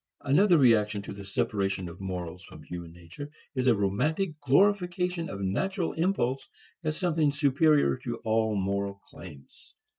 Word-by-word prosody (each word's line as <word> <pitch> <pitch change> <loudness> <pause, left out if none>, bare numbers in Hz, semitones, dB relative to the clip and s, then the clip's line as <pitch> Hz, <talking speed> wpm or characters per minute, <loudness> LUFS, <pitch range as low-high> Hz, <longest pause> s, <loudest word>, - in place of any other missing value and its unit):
Another 175 +6 +4
reaction 110 -6 +3
to - - -7
the 100 0 -9
separation 95 -1 -1
of 85 +2 -10
morals 90 -2 -5
from - - -13
human 85 -1 -8
nature 90 - -10 0.2
is 130 -2 -1
a 120 - +5
romantic 150 - 0
glorification 180 +3 +2
of 100 - -6
natural 175 - -1
impulse 150 -7 -1 0.3
as 155 -1 -2
something 165 -5 +1
superior 140 - +3
to - - -5
all 110 -1 +1
moral 100 0 -1
claims. 75 -9 -14
115 Hz, 145 wpm, -28 LUFS, 95-160 Hz, 0.3 s, a